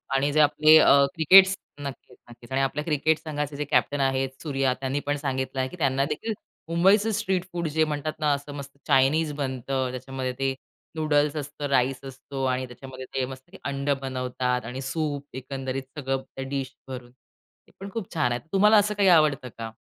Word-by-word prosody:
आणि 140 +2 +2
जे 155 - +3
आपले 155 +1 +6
अ, 140 -2 +6
क्रिकेटस 190 +4 +7 0.3
नक्कीच, 135 -2 -8
नक्कीच. 120 +1 -15
आणि 135 - +1
आपल्या 135 +2 -1
क्रिकेट 155 0 +1
संघाचेजे 150 -1 -4
कॅप्टन 145 0 +1
आहेत, 135 0 +1
सूर्या 135 -4 0
त्यांनी 135 +1 -1
पण 145 0 0
सांगितलं 130 -1 -3
आहे, 130 - +1
की 180 - -11
त्यांना 135 -3 +1
देखील 220 +10 -3 0.4
मुंबईच 195 +6 +4
स्ट्रीट 190 -5 0
फूड 170 -2 -2
जे 160 +1 +1
म्हणतात 155 0 -2
ना 150 -1 +2
असं 140 +1 -5
मस्त 140 -1 -9
चाइनीज 150 +3 +3
बनतं. 130 -2 -2
त्याच्यामध्ये 130 0 -4
ते 135 0 +1 0.4
नूडल्स 150 -1 +1
असतो, 145 0 -4
राईस 130 -1 +2
असतो 135 0 -7
आणि 130 0 0
त्याच्यामध्ये 130 +1 -10
ते 130 -1 0
मस्त 130 +7 -11
अंड 140 0 -3
बनवतात 125 -2 -2
आणि 125 +3 -5
सूप 145 +1 -3
एकंदरीत 130 0 -4 0.2
सगळं 135 -1 -1
त्या 135 0 -5
डीश 135 -1 -4
भरून. 125 -2 -8
ते 125 - -34
पण 195 - -7
खूप 220 -6 -5
छान 150 -7 +1
आहे. 120 - -1
तुम्हाला 210 +2 +6
असं 210 +1 +3
काही 200 -2 +3
आवडतं 150 -6 +4
का? 115 -1 -6
140 Hz, 180 wpm, -26 LUFS, 130-155 Hz, 0.4 s, क्रिकेटस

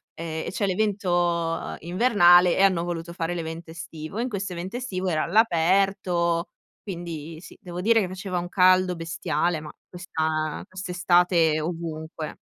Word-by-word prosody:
ehm, 160 -1 -5
e - - -3
c'è 205 - -1
l'evento 175 -4 0
invernale 175 -2 +5
e - - +3
hanno 185 -4 +3
voluto 170 -1 -5
fare 165 0 -2
l'evento 165 0 -6
estivo. 160 +2 -8
E - - +1
in 255 - -2
questo 195 -4 -4
evento 180 +6 -5
estivo 190 -7 -3
era 155 -3 +1
all'aperto, 175 -2 +2 0.3
quindi 165 -4 -6
sì, - - -13
devo 175 0 -7
dire 225 +3 +4
che 190 - -1
faceva 185 0 -4
un 175 0 -3
caldo 185 0 +4
bestiale, 165 0 -1
ma 150 0 -9 0.2
questa 160 -4 -2
quest'estate 175 -3 +2
ovunque. 160 -1 -5
175 Hz, 150 wpm, -25 LUFS, 165-185 Hz, 0.3 s, invernale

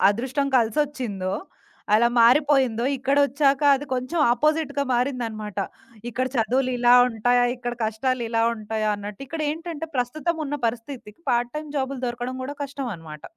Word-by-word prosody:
అదృష్టం 260 +7 0
కల్సొచ్చిందో, 230 -6 0 0.6
అలా 235 +2 +5
మారిపోయిందో 255 -1 +4
ఇక్కడొచ్చాక 280 +1 +2
అది 290 +2 -4
కొంచెం 255 +7 -2
ఆపోజిట్‌గా 290 +2 +1
మారిందనమాట. 235 -5 -2 0.5
ఇక్కడ 255 +2 -1
చదువులిలా 245 +1 +3
ఉంటాయా? 245 +1 +2
ఇక్కడ 240 0 -4
కష్టాలు 240 +4 -1
ఇలా 225 0 +1
ఉంటాయా? 215 0 -2
అన్నట్టు 205 +3 -7
ఇక్కడేంటంటే 320 +2 -4
ప్రస్తుతమున్న 305 +4 -2
పరిస్థితికి 230 +1 -6
పార్ట్ 240 0 +1
టైమ్ 305 0 -5
జాబులు 265 -1 -2
దొరకడం 245 +2 -4
కూడా 275 +3 -5
కష్టమనమాట. 200 - -6
250 Hz, 115 wpm, -24 LUFS, 225-280 Hz, 0.6 s, అలా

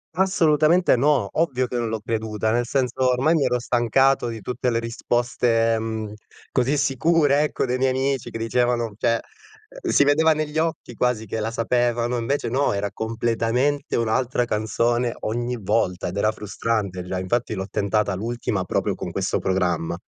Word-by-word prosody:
Assolutamente 175 -3 +3
no, 135 -3 +2
ovvio 130 -6 0
che 125 - -3
non 120 -1 -1
l'ho 110 0 -2
creduta, 110 -1 -1
nel 120 +1 +1
senso 130 0 0
ormai 135 +7 +2
mi 155 - +2
ero 125 - +1
stancato 125 +2 +2
di 115 -2 -6
tutte 125 +3 -2
le 115 - +1
risposte, 115 0 0
mhmm, 110 -1 -4 0.4
così 130 +3 +1
sicure 145 +1 +2
ecco, 150 - -1
dei 125 0 -1
miei 130 0 +2
amici 135 0 -1
che - - -5
dicevano 120 -1 0
cioè 115 +1 +1 0.6
si 145 - +3
vedeva 160 +3 +4
negli 155 0 -2
occhi 160 -6 -2
quasi 120 -1 0
che 110 +2 -4
la 110 +1 -2
sapevano 120 +1 0
e - - -1
invece 140 +5 -1
no, 135 +4 +1
era 100 0 -1
completamente 115 +6 -1
un'altra 120 +2 0
canzone 115 +2 0
ogni 120 +3 -2
volta, 95 -2 0
ed 90 - -5
era 105 +2 +2
frustrante 105 -3 -3
già, 90 +1 -3
infatti 110 +5 -1
l'ho 95 -2 -4
tentata 100 0 0
l'ultima 110 -1 -2
proprio - - -1
con - - -6
questo - - -1
programma. 90 -3 -1
120 Hz, 165 wpm, -23 LUFS, 110-130 Hz, 0.6 s, vedeva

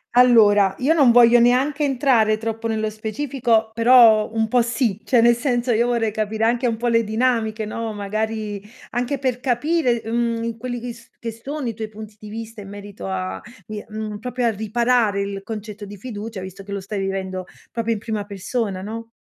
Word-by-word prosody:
Allora, 210 -6 +6
io 280 +5 +2
non 280 -7 +5
voglio 240 0 +7
neanche 265 +5 +3
entrare 245 -6 +3
troppo 225 0 -3
nello 220 -1 -1
specifico, 225 0 0
però 230 -2 +6
un 225 0 0
po' 245 +2 +3
sì, 235 -3 -1
cioè 240 -2 +3
nel 235 +1 +6
senso 245 -1 0
io 235 +2 +2
vorrei 230 -3 0
capire 215 +1 -2
anche 240 +2 +2
un 225 -1 -1
po' 240 - -4
le 230 -1 +3
dinamiche, 220 -1 0
no, 225 +1 -4
magari 210 0 -3 0.3
anche 245 +4 -1
per 255 -2 -1
capire, 250 -1 +1
mhmm, 230 0 -1
quelli 245 +1 -4
che 240 0 -6
s 230 0 -17
che 230 -1 -4
sono 265 +4 -5
i 230 - -2
tuoi 220 0 -5
punti 215 0 -11
di 210 - -10
vista 225 +1 -7
in 195 - -10
merito 205 - -8
a, 95 0 -3 0.2
vi 215 -1 -6
mhmm, 215 -1 -5
proprio 250 +1 -2
a - - +4
riparare 220 0 +1
il 200 0 -4
concetto 210 0 -7
di 205 +1 -10
fiducia, 210 -2 -7
visto 190 +1 -8
che 200 +1 -11
lo 200 - -3
stai 200 +1 -5
vivendo 190 -1 -3 0.3
proprio 230 0 -1
in 220 - -4
prima 215 -1 -3
persona, 200 -1 -3
no? 225 +3 -6
225 Hz, 195 wpm, -21 LUFS, 210-240 Hz, 0.3 s, voglio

